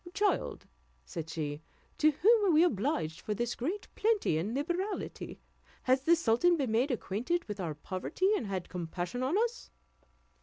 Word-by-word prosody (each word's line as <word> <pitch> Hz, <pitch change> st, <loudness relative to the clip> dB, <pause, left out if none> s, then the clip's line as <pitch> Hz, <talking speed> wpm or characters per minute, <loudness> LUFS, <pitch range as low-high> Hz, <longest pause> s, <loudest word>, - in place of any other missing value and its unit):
"Child," 410 Hz, 0 st, 0 dB, 0.4 s
said 165 Hz, -3 st, -6 dB
she, 150 Hz, -2 st, -3 dB, 0.4 s
"to 310 Hz, -, +6 dB
whom 420 Hz, +8 st, +4 dB
are -, -, +5 dB
we 315 Hz, +1 st, +6 dB
obliged 205 Hz, -, 0 dB
for 210 Hz, -, -2 dB
this 240 Hz, +2 st, -1 dB
great 345 Hz, -, -3 dB
plenty 430 Hz, -, +2 dB
and 210 Hz, +8 st, -2 dB
liberality? 350 Hz, +8 st, -3 dB, 0.4 s
Has 260 Hz, +1 st, +3 dB
the 340 Hz, -, +6 dB
sultan 335 Hz, +4 st, +3 dB
been 265 Hz, -6 st, -1 dB
made 240 Hz, +6 st, +2 dB
acquainted 250 Hz, -, -1 dB
with 210 Hz, -1 st, -5 dB
our 165 Hz, -5 st, -3 dB
poverty, 190 Hz, -, -1 dB
and 230 Hz, -, -2 dB
had 190 Hz, -3 st, -3 dB
compassion 175 Hz, +5 st, -4 dB
on 270 Hz, +9 st, +1 dB
us?" 470 Hz, +2 st, -1 dB
255 Hz, 160 wpm, -31 LUFS, -, 0.4 s, to